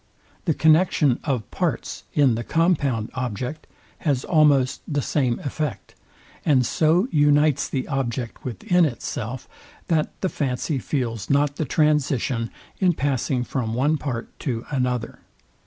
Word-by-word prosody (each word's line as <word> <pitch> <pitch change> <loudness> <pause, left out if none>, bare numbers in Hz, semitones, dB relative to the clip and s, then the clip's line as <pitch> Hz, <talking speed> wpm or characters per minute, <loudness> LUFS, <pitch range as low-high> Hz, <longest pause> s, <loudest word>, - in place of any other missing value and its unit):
The 160 -5 +1
connexion 155 -5 +4
of 125 -9 -2
parts - - -2
in 140 -5 +4
the 115 +1 -2
compound 140 -10 +1
object 125 +3 -4 0.3
has 140 -5 0
almost 145 -5 +3
the 145 -2 -1
same 125 -5 +1
effect, 150 - -4 0.5
and 135 -5 +3
so 165 - +2
unites 145 -1 +3
the 130 - -2
object 125 -3 -3
within 130 - +1
itself, 125 -3 -3 0.4
that 160 -3 +2
the 190 - +1
fancy 135 0 -2
feels 115 -7 -3
not 140 0 +2
the 155 - -1
transition 135 -5 +1 0.3
in 185 -2 +3
passing 135 -3 0
from 115 -3 -2
one 145 +5 +2
part 125 -6 -4
to 120 -5 -3
another. 125 -3 -1
135 Hz, 130 wpm, -23 LUFS, 125-150 Hz, 0.5 s, connexion